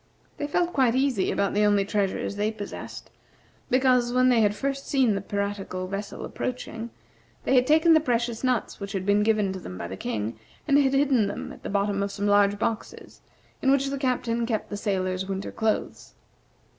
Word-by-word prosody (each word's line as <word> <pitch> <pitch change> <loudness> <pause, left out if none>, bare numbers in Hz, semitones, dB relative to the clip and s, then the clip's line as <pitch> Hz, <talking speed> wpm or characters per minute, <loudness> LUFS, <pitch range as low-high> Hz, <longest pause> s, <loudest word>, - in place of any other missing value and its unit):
They 290 - -3
felt 350 +4 0
quite 255 -4 +3
easy 260 -7 +1
about 200 -1 0
the 210 - +2
only 205 -1 +3
treasures 200 -1 -1
they 210 +1 0
possessed, 205 -2 -8 0.6
because, 255 -2 +3
when 255 +1 +4
they 240 -3 +4
had 205 -1 +2
first 275 +3 -3
seen 260 -6 +3
the 195 - -2
piratical 200 -2 -3
vessel 200 +2 -5
approaching, 235 -2 -5 0.5
they - - +1
had 255 -1 +4
taken 320 +2 +5
the 315 - +6
precious 240 -4 -1
nuts 255 -2 0
which 200 0 -6
had 190 -2 -2
been 205 +1 +3
given 210 -3 +2
to 190 - -6
them 90 - -8
by 85 - -5
the 95 - -6
King, 110 +3 -4 0.3
and 285 -1 +5
had 275 -1 +2
hidden 270 -6 +3
them 205 - -5
at - - -14
the - - -6
bottom 200 0 0
of 200 0 -1
some 205 0 -3
large 205 0 +4
boxes, 225 +1 -4 0.4
in 265 - +2
which 275 0 +2
the 275 - -3
Captain 235 -3 0
kept 220 -3 -2
the - - -2
sailors' 190 -2 -1
winter 195 0 -4
clothes. 220 -1 -2
215 Hz, 195 wpm, -26 LUFS, 200-255 Hz, 0.6 s, the